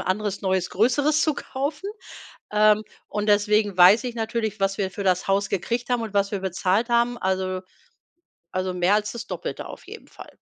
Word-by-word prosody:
anderes 200 +1 -2
neues, 190 -2 0
größeres 285 +8 +2
zu 310 -2 +2
kaufen, 295 +10 -4 0.6
ähm, 215 0 +4 0.2
und 210 0 -3
deswegen 205 -1 +2
weiß 190 +7 +7
ich 245 - -4
natürlich, 220 -2 -3
was 195 0 0
wir 190 -2 -1
für 200 +1 -5
das 180 -1 +2
Haus 200 +1 +2
gekriegt 235 +6 -2
haben 245 -1 +1
und 220 -3 -6
was 200 0 +1
wir 200 - -3
bezahlt 190 +5 0
haben. 235 0 +2
Also 185 -1 -1 0.9
also, 185 0 -2
mehr 180 +3 +2
als 210 0 +1
das 235 0 -6
Doppelte - - -5
auf - - -11
jeden - - -11
Fall. - - -13
210 Hz, 185 wpm, -24 LUFS, 190-235 Hz, 0.9 s, weiß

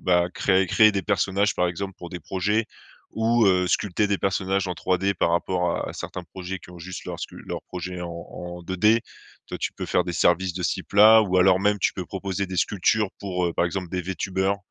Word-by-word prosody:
bah, 90 -1 +3
créer 95 -1 +2
créer 110 +4 +5
des 100 -2 -2
personnages, 100 +2 +1
par 90 0 +1
exemple, 95 +3 -4
pour 90 - -9
des 90 - -5
projets 100 +7 -1 0.5
ou, 115 +1 +2
heu, 90 -1 +3
sculpter 105 +2 +1
des 100 -1 +1
personnages 95 0 0
en 90 - -2
3D 95 +3 0
par 85 - +1
rapport 90 0 0
à - - -6
certains 90 - -7
projets 95 +2 -6
qui 90 - -15
ont 90 -1 -12
juste 90 +1 -7
leurs - - -6
scu - - -7
leur - - -5
projet 90 0 -6
en 90 - -4
en 85 +1 -8
2D. 105 +6 +3 0.4
Toi, - - -5
tu - - -2
peux - - -6
faire - - +2
des 90 - -4
services 85 +3 +2
de 90 -1 -3
ce - - +2
type 95 -6 -8
là 110 +2 +8
ou 95 -3 0
alors 90 0 +5
même 105 +1 +2
tu - - +1
peux 95 - -5
proposer 95 0 -3
des 95 0 -6
sculptures 105 +3 +1
pour, 90 -2 -2
heu, 85 - -1
par 85 - +1
exemple 90 +1 -4
des 90 - -2
Vtubers. 95 +2 -1
95 Hz, 230 wpm, -24 LUFS, 90-100 Hz, 0.5 s, là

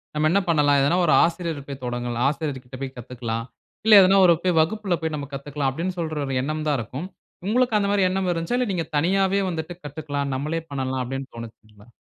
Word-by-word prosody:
"நம்ம 155 +1 +2
என்ன 200 - +4
பண்ணலாம்? 145 -4 +4
எதனா 160 +6 +2
ஒரு 155 - +4
ஆசிரியர் 165 -4 -2
போய் 135 -1 -7
தொடங்கலாம் 120 0 -2
ஆசிரியர்கிட்ட 135 -4 -5
போய் 135 -1 -4
கத்துக்கலாம். 115 -1 -5 0.4
இல்ல, 220 - +6
எதனா 190 +1 +5
ஒரு 175 - +7
போய் 180 -3 +2
வகுப்பில 190 +1 0
போய் 160 -1 -2
நம்ம 140 -1 -6
கத்துக்கலாம்." 140 0 -2
அப்படீன்னு 180 +6 -4
சொல்ற 155 -2 -3
ஒரு 135 - -2
எண்ணம் 155 +2 -3
தான் 145 - +2
இருக்கும். 130 - -5 0.4
உங்களுக்கு 245 0 +2
அந்த 200 - 0
மாரி 195 -2 +3
எண்ணம் 185 0 -1
இருந்துச்சா? 170 +9 -1
இல்ல, 250 -4 0
"நீங்க 165 -2 -2
தனியாவே 195 +4 +2
வந்துட்டு 165 0 -4
கத்துக்கலாம். 145 -1 -4
நம்மளே 155 +5 -2
பண்ணலாம்." 130 -1 -2
அப்படீன்னு 135 +2 -5
தோணுச்சுங்களா? 110 -2 -12
150 Hz, 195 wpm, -23 LUFS, 135-180 Hz, 0.4 s, ஒரு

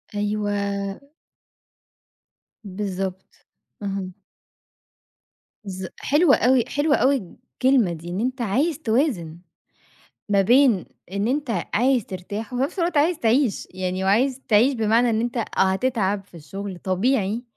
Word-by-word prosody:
أيوه 205 -1 -1 1.8
بالضبط. 190 -2 -5 0.5
اهم. 195 -2 -4 1.5
ز 190 -2 -6
حلوة 295 0 +4
أوي، 250 0 +3
حلوة 290 +1 +1
أوي 270 +3 +3 0.5
الكلمة 255 -9 +4
دي، 170 +1 -8
إن 180 - -3
أنت 255 +3 -2
عايز 270 - 0
توازن 220 - 0 0.9
ما 200 -1 +3
بين 240 -2 +4 0.3
إن 200 +2 -1
أنت 250 - -1
عايز 250 0 +2
ترتاح 205 +5 -6
وفي 250 +1 -1
نَفْس 285 - -3
الوقت 340 -2 0
عايز 315 +3 +3
تعيش 235 -2 +1
يعني 185 0 -2
وعايز 250 +7 +2
تعيش 240 +6 +4
بمعنى 230 +2 +2
إن 220 - +1
أنت 240 +1 -3
آه، 230 - 0 0.3
هتتعب 205 -3 0
في 175 - -17
الشُغل 185 +5 -7
طبيعي، 205 +4 0
215 Hz, 125 wpm, -23 LUFS, 195-260 Hz, 1.8 s, حلوة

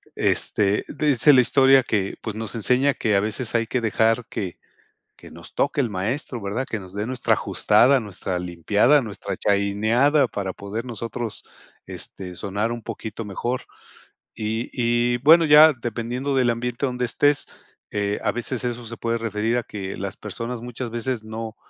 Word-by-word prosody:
este, 105 0 +1
dice 145 -1 +3
la 130 - +7
historia 135 +2 +5
que, 100 -5 -1
pues, 110 -2 -5
nos 110 +1 -5
enseña 125 +5 +2
que 110 -3 0
a - - +5
veces 110 +4 -2
hay 115 -1 +1
que 125 +1 -1
dejar 115 +2 +2
que 95 -4 -4 0.6
que - - -14
nos - - -12
toque 145 +2 0
el 125 -4 +1
maestro, 115 +6 -3
¿verdad? 105 +7 -2
Que 110 - -2
nos 95 -1 -11
dé, 105 +1 -3
nuestra 130 0 +1
ajustada, 130 +2 +3
nuestra 95 -3 -4
limpiada, 100 - +2
nuestra 100 -3 -5
chaineada, 110 +8 +2
para 100 -3 -4
poder 100 +5 -6
nosotros, 115 -1 -5 0.4
este, 90 -2 -7
sonar 100 +5 -2
un 120 - -6
poquito 110 +2 -6
mejor. 120 +5 -3 0.7
Y 110 +1 -3
y, 120 0 +1
bueno, 165 +3 +7
ya 155 +1 +8
dependiendo 120 +3 -3
del 125 -2 +3
ambiente 120 +3 -2
donde 125 -1 -1
estés, 145 +4 +1 0.4
eh, 100 0 -1
a 105 - +2
veces, 120 +2 -4
eso 120 -1 -3
se 115 +1 -8
puede 115 0 -1
referir 115 +1 -1
a 120 - -1
que 100 -3 -6
las 95 0 -5
personas, 115 +3 -6
muchas 120 0 -6
veces 120 0 -3
no 110 0 -6
115 Hz, 170 wpm, -23 LUFS, 105-125 Hz, 0.7 s, ya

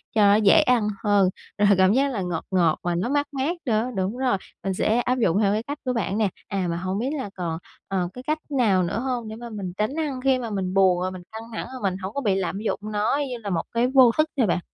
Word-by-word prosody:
cho 215 - +4
nó 205 0 +6
dễ 215 +8 +6
ăn 245 -6 +2 0.2
hơn, 200 -3 +4 0.3
rồi 205 0 +4
cảm 190 +2 +5
giác 275 +2 +2
là 205 - -2
ngọt 175 -3 -3
ngọt 170 -4 +2
mà 175 -1 0
nó 185 +8 -1
mát 290 +1 +1
mát 280 +6 -1
nữa. 230 0 +1
Đúng 195 +5 -1
rồi, 255 -6 +1 0.3
mình 195 -1 -1
sẽ 220 +5 +1
áp 250 +1 0
dụng 200 -4 +2
theo 200 0 +3
cái 220 +2 -1
cách 285 +3 -5
của 255 - 0
bạn 210 -3 -1
nè. 210 -3 +2 0.2
À, 195 -3 -1
mà 170 - -2
hông 185 +2 -2
biết 250 +4 -1
là 235 -7 -4
còn, 165 -3 -3 0.3
ờ, 185 -2 -1
cái 250 - -9
cách 310 +1 0
nào 220 -10 +2
nữa 185 +5 -2
hông 245 -3 -2
để 220 - -6
mà 235 +1 -8
mình 200 -5 -5
tránh 215 +7 -1
ăn 295 -5 -2
khi 265 0 +3
mà 235 - -4
mình 190 -3 -2
buồn, 190 -2 +4
rồi 185 - -1
mình 185 -1 -9
căng 220 +1 -7
thẳng, - - -4
rồi 255 - -7
mình 190 -2 0
hổng 190 +1 -6
có 280 - -2
bị 205 -7 +1
lạm 190 0 -2
dụng 220 - -2
nó 215 +5 0
như 245 - -4
là 215 -3 -6
một 170 -4 0
cái 235 +1 +2
vô 260 -2 +6
thức 310 0 +3
ha 250 - +4
bạn? 180 -2 +1
210 Hz, 280 wpm, -24 LUFS, 190-250 Hz, 0.3 s, nó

